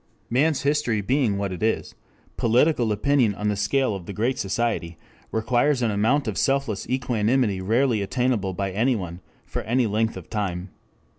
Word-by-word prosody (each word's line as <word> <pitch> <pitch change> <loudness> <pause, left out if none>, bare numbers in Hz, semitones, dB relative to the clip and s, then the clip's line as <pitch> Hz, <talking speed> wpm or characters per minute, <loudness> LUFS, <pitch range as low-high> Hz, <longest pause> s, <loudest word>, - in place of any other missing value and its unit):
Man's 145 +5 +2
history 140 -7 +1
being 120 -1 +1
what 100 -1 -2
it 90 - -6
is, 110 +1 0 0.4
political 120 0 +2
opinion 115 0 +2
on 105 +1 -1
the 105 - 0
scale 110 +4 +1
of 95 -3 -7
the 100 - -5
Great 125 +5 -1
Society 95 -5 -1 0.3
requires 125 +4 +1
an 115 - +2
amount 115 +7 +1
of 100 -5 -2
selfless 135 -7 0
equanimity 120 -4 +1
rarely 115 +3 +2
attainable 105 -2 0
by 100 0 -2
any 120 +7 +2
one 90 -4 -5 0.3
for - - -4
any 120 +3 +1
length 110 +1 0
of - - -9
time. 95 -4 -3
110 Hz, 165 wpm, -24 LUFS, 100-130 Hz, 0.4 s, Man's